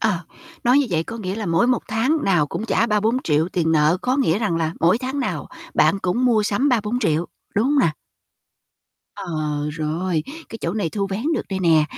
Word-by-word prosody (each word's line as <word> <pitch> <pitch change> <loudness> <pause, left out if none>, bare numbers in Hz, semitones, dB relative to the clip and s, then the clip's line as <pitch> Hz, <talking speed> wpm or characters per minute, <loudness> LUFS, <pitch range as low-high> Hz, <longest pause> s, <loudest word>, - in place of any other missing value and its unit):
Ờ, 215 -6 +1 0.5
nói 250 +4 +5
như 280 - +2
vậy 160 -1 +1
có 225 +6 -7
nghĩa 190 -3 -4
là 215 -3 -4
mỗi 165 +8 +2
một 250 -2 +1
tháng 235 +9 +1
nào 175 -6 +3
cũng 215 - -4
trả 230 0 +1
3-4.000.000 210 - +1
tiền 165 -2 +1
nợ, 155 +3 +4
có 255 +2 +1
nghĩa 205 - +2
rằng 205 -7 0
là 160 -1 -1
mỗi 175 +7 +4
tháng 265 +2 -3
nào 255 - -3 0.3
bạn 200 - +3
cũng 195 +8 0
mua 225 -4 +3
sắm 220 +7 +1
3-4.000.000, 210 - +1 0.3
đúng 210 - +2
hông 285 +2 +2
nè? 170 - +4 1.2
Ờ, - - -7 0.5
rồi. 160 +1 -1 0.3
Cái 225 - -8
chỗ - - -2
này 205 -6 -1
thu 200 -2 -2
vén 200 +5 -2
được - - -1
đây 190 - -1
nè. 160 -3 +4
205 Hz, 205 wpm, -22 LUFS, 165-235 Hz, 1.2 s, nói